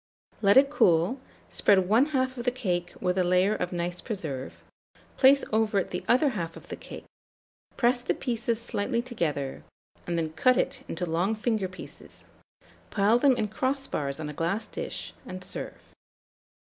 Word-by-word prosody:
Let 200 +1 +5
it 275 +1 +6
cool, 180 - +3 0.3
spread 190 -3 +3
one 230 +8 +4
half 260 -3 0
of 240 - -5
the - - +4
cake 180 -8 -2
with 180 0 0
a - - +4
layer 180 +3 +3
of 180 -4 -2
nice 175 0 -3
preserve, 155 - -5 0.5
place 275 +1 +5
over 220 -2 +2
it 195 - 0
the 180 - -3
other 260 +5 +4
half 170 -9 -4
of - - -14
the - - -4
cake, - - -10 0.7
press 245 0 +2
the 250 - -1
pieces 235 -2 -2
slightly 235 0 -2
together, 155 - -3 0.4
and 170 -1 -1
then 160 -1 -2
cut 250 +10 +3
it - - -1
into 180 +2 -3
long 175 +6 0
finger 215 -3 0
pieces; 185 0 -12 0.7
pile 215 +3 +3
them 265 -2 +4
in 215 - 0
crossbars 240 - -2
on 155 - -4
a 150 - -6
glass 170 +8 -1
dish, - - -6
and 185 0 -8
serve. 180 - -4
200 Hz, 170 wpm, -27 LUFS, 175-245 Hz, 0.7 s, it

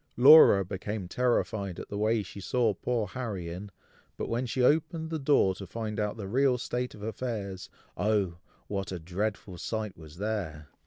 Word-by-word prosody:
Laura 130 -7 +9
became 100 +1 -4
terrified 110 -5 0
at - - -8
the 100 - -4
way 110 0 +2
she 100 +1 -10
saw 115 +2 +1
poor 115 +3 -1
Harry 100 -5 -5
in, 95 +4 -7 0.5
but - - -3
when 120 +2 -1
she 125 +2 0
opened 160 +3 +2
the 160 - -1
door 135 -9 +3
to 95 +1 -9
find 110 +1 -4
out 105 +1 -1
the 100 -3 -5
real 130 +4 +3
state 125 +1 -3
of 105 - -11
affairs, 105 -5 -4 0.3
oh! 100 -3 +1 0.3
what 100 0 -3
a 90 - -3
dreadful 90 +2 -4
sight 110 -3 -3
was 80 -1 -13
there! 90 -8 -3
105 Hz, 175 wpm, -29 LUFS, 95-120 Hz, 0.5 s, Laura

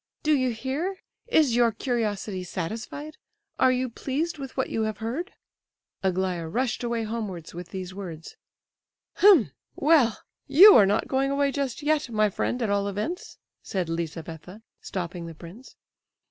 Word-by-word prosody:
"Do 305 - +3
you 255 -2 +1
hear? 270 - -3 0.3
Is 310 - +3
your 240 -1 +4
curiosity 210 -6 -2
satisfied? 220 - -5 0.4
Are 260 - +5
you 255 0 0
pleased 290 +7 -3
with 270 -1 -8
what 260 - -1
you 225 - -1
have 215 -1 -2
heard?" 250 - -4 0.7
Aglaya 185 -3 -1
rushed 240 +7 -1
away 235 -1 -1
homewards 210 -7 -5
with 175 0 -8
these 185 0 -6
words. 175 -5 -8 0.8
"H'm! 340 - +6 0.2
well, 285 -8 +3 0.3
you 355 +10 +9
are 205 -4 +7
not 200 - +1
going 270 +1 +1
away 280 0 +1
just 280 -1 -3
yet, 300 -3 +1
my 215 -2 +2
friend, 245 +5 -1
at 220 - 0
all 200 0 +1
events," 210 - -4 0.2
said 185 -5 -3
Lizabetha, 165 +4 -6 0.2
stopping 175 -2 -5
the 165 - -9
prince. 180 +11 -13
225 Hz, 150 wpm, -26 LUFS, 185-275 Hz, 0.8 s, you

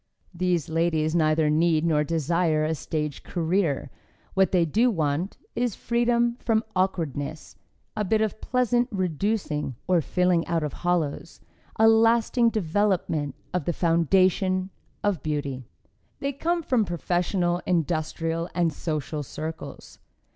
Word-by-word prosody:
These 175 -2 0
ladies 160 -1 +1
neither 155 -2 +3
need 160 +1 +2
nor 150 -3 +2
desire 160 0 +1
a 160 - 0
stage 150 -2 -3
career; 170 -3 -1 0.4
what 190 0 +3
they 175 -3 +3
do 225 +11 +3
want 160 -1 -1 0.2
is 240 -4 0
freedom 235 0 +1
from 225 -1 +1
awkwardness, 155 -5 -2 0.4
a 215 - 0
bit 215 +3 +2
of 220 0 -1
pleasant 245 -1 +1
reducing 185 - -1
or 180 -2 +3
filling 180 +1 +1
out 165 -2 0
of 150 - -3
hollows, 170 -2 -1 0.4
a 220 - +5
lasting 230 +1 +4
development 185 -7 0 0.2
of 180 -5 -1
the 175 - 0
foundation 185 +3 +2 0.3
of 205 -5 0
beauty. 140 -5 -3 0.5
They 280 0 -2
come 335 +5 -1
from 250 -6 +2
professional, 175 0 0
industrial 165 0 -1
and 170 -3 +1
social 150 -2 -3
circles. 155 +3 -7
175 Hz, 125 wpm, -25 LUFS, 155-205 Hz, 0.5 s, a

